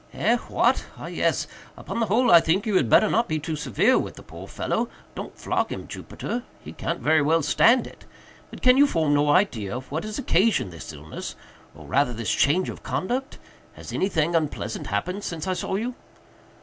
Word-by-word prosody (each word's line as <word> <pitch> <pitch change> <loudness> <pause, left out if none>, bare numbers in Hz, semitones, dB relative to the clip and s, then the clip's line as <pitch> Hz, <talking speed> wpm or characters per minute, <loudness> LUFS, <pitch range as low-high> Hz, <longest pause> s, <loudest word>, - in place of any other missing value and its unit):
"Eh?—what?—ah - - 0
yes!—upon - - -3
the 225 - +1
whole 235 +6 +3
I 170 - +10
think 175 +6 +1
you 215 -3 0
had 125 - +3
better 215 - +6
not 230 +2 +1
be 155 - -1
too 155 +1 -3
severe 210 - +2
with - - -5
the - - -12
poor - - -10
fellow—don't - - -5
flog - - -1
him, - - -6
Jupiter—he 240 +1 -7
can't 170 +1 -3
very 155 0 +3
well 160 +2 +2
stand 235 - +4
it—but - - -16
can 255 0 +6
you 285 +1 +6
form 160 - +1
no 145 0 +3
idea 125 - +1
of 130 +1 -10
what 160 +3 -2
has 215 -1 -5
occasioned 210 - +2
this 85 0 -9
illness, 75 0 -8 0.4
or - - -12
rather 135 -2 +1
this 115 -1 -2
change 175 +7 +2
of - - -7
conduct? 260 +9 -3 0.4
Has - - -10
anything 170 -4 0
unpleasant 150 -9 -2
happened 180 - -2
since 160 -2 -4
I 185 - +1
saw 185 - -3
you?" 235 +5 -2
170 Hz, 180 wpm, -24 LUFS, 145-215 Hz, 0.4 s, I